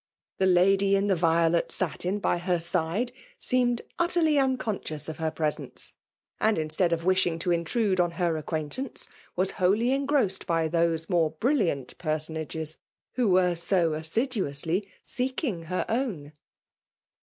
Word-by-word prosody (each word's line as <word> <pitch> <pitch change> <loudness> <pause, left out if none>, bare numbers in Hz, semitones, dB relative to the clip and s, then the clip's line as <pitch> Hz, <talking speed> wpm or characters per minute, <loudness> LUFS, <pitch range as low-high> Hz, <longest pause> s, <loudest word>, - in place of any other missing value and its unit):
The 190 - +3
lady 195 +2 +4
in 195 0 +1
the 200 -2 +2
violet 165 0 +2
^satin 185 +2 -2
by 175 - 0
her 175 0 0
side, 170 +7 -1 0.3
seemed 245 -1 +2 0.2
utterly 340 -4 +3
unconscious 230 - -1
of 160 - -5
her 160 0 0
♦ - - -26
presence, 155 -2 -2 0.5
and 220 0 +2
instead 160 +3 0
of 165 0 -1
wishing 185 -3 +2
to 170 +2 -1
intrude 185 +4 +1
on 175 -1 +3
her 175 -3 +1
acquaintance, 155 - -4 0.3
was 185 +2 +1
wholly 210 +7 +3
engrossed 275 -7 0
bjr 165 -2 +1
those 165 -1 +1
mdre 165 -3 +1
brflliattt 195 - 0
pensonages 155 0 -3 0.4
Vho 245 -5 +2
were 180 -1 +4
so 170 0 +1
asstduc^usly 170 - 0 0.2
seeldng 250 - -1
ber 185 - -1
own. 220 - -2
180 Hz, 140 wpm, -27 LUFS, 160-220 Hz, 0.5 s, lady